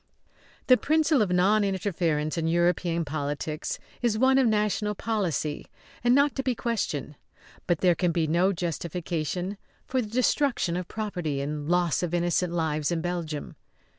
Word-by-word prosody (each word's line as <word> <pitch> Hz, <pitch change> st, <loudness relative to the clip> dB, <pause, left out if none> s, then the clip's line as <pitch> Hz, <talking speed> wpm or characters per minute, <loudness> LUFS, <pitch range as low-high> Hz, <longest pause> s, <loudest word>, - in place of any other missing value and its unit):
The 255 Hz, -, +6 dB
principle 310 Hz, -2 st, +2 dB
of 200 Hz, -4 st, +1 dB
non 195 Hz, +4 st, +4 dB
interference 170 Hz, -6 st, -1 dB
in 165 Hz, -1 st, -1 dB
European 170 Hz, 0 st, +1 dB
politics 150 Hz, +1 st, -3 dB, 0.2 s
is 235 Hz, -3 st, +1 dB
one 265 Hz, +3 st, +4 dB
of 260 Hz, -, +4 dB
national 210 Hz, -1 st, +1 dB
policy 185 Hz, -9 st, -2 dB, 0.4 s
and 245 Hz, +1 st, +5 dB
not 280 Hz, 0 st, +4 dB
to -, -, +1 dB
be 255 Hz, -2 st, -1 dB
questioned. 205 Hz, -, -2 dB, 0.5 s
But 175 Hz, -3 st, +1 dB
there 180 Hz, -2 st, +5 dB
can 175 Hz, 0 st, 0 dB
be 165 Hz, -1 st, +1 dB
no 170 Hz, +5 st, +2 dB
justification 175 Hz, +2 st, -3 dB, 0.3 s
for 260 Hz, 0 st, 0 dB
the 215 Hz, -, -6 dB
destruction 250 Hz, -5 st, +1 dB
of 180 Hz, 0 st, -3 dB
property 180 Hz, -10 st, -3 dB
and 145 Hz, +2 st, -4 dB
loss 175 Hz, -2 st, +2 dB
of 175 Hz, -1 st, -1 dB
innocent 175 Hz, 0 st, +1 dB
lives 160 Hz, -2 st, 0 dB
in 170 Hz, -1 st, 0 dB
Belgium. 170 Hz, -4 st, -4 dB
175 Hz, 155 wpm, -27 LUFS, 160-215 Hz, 0.5 s, The